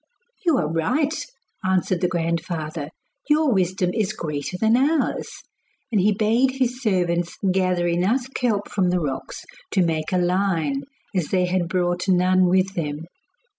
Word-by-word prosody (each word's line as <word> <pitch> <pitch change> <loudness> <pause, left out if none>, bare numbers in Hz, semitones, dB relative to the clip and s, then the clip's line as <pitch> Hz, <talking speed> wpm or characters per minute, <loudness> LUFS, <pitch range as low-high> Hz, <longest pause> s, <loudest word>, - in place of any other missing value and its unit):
'You 335 -6 +3
are 160 - 0
right,' 290 - 0 0.4
answered 185 -1 +1
the 180 - +3
grandfather; 165 -3 -2 0.4
'your 300 -3 +4
wisdom 185 -1 +1
is 215 -2 0
greater 150 +2 -4
than 220 +3 +3
ours.' 290 +5 0 0.5
And 210 -4 +3
he 210 +3 +4
bade 225 +5 +2
his 255 -1 -1
servants 175 -6 0
gather 185 -2 +1
enough 190 +9 +1
kelp 215 -5 0
from 185 -3 0
the 180 0 +1
rocks 145 -5 -5 0.2
to 190 - +2
make 155 -2 -1
a 185 - +2
line, 185 - +1 0.3
as 175 -5 0
they 185 -1 +1
had 180 -1 0
brought 175 0 0
none 185 0 +4
with 185 +1 +2
them. 150 -4 -3
185 Hz, 150 wpm, -23 LUFS, 170-215 Hz, 0.5 s, your